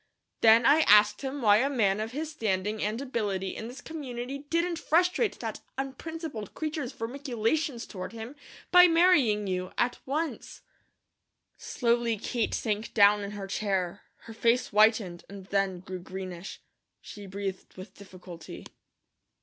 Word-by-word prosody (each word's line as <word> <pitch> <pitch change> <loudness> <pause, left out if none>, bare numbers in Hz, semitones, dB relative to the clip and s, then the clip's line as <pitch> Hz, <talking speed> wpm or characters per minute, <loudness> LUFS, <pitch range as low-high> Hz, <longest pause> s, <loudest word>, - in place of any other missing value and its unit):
Then 225 +1 +6
I 300 - +6
asked 210 0 +6
him 270 -1 -4
why 205 -1 +6
a 265 +5 +2
man 210 -7 +1
of 220 +1 -3
his 305 +4 -4
standing 210 -5 -2
and 215 +3 -1
ability 205 -8 -3
in 225 - -6
this 250 +4 -9
community 270 -4 -6
didn't 335 +4 -1
frustrate 360 +9 +1
that - - -4 0.2
unprincipled 275 - -6
creature's 310 -5 -3
vermiculations 250 +2 -2
toward 185 -3 -7
him, 230 +4 -8 0.4
by 360 0 +9
marrying 330 - +4
you, 185 -1 -3
at 245 0 0
once." 310 +4 -4 0.9
Slowly 235 -2 0
Kate 230 +2 -2
sank 215 0 -3
down 205 -1 +6
in 200 +1 -6
her 195 - -5
chair. 195 -2 -2 0.2
Her 225 - -11
face 235 +2 +1
whitened 210 -4 +3
and 195 -1 -10
then 195 -2 -1
grew 185 0 -7
greenish. 185 0 -8 0.4
She 205 -1 -10
breathed 195 -1 -6
with 185 +3 -10
difficulty. 180 -4 -11
225 Hz, 140 wpm, -28 LUFS, 200-275 Hz, 0.9 s, by